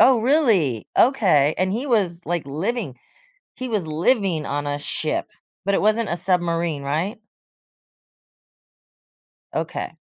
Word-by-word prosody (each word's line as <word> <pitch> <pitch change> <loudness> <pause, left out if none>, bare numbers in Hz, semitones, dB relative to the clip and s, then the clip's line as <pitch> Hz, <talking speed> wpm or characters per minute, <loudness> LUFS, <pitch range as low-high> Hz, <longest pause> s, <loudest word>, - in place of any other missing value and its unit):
Oh, 255 -3 +6
really? 220 - +2
Okay. 180 - +4
And, 185 +1 0
he 240 +7 -2
was, 190 -9 +1
like, 170 -4 -1
living 170 - -2 0.6
he 255 - -5
was 210 -6 -1
living 170 - +1
on 145 +1 -2
a 145 - -1
ship, - - -2 0.4
but 200 - +1
it - - +1
wasn't 215 +1 +2
a 170 - 0
submarine, 170 -4 0
right? 160 +10 -2 2.3
Okay. - - -4
180 Hz, 125 wpm, -22 LUFS, 155-225 Hz, 2.3 s, Oh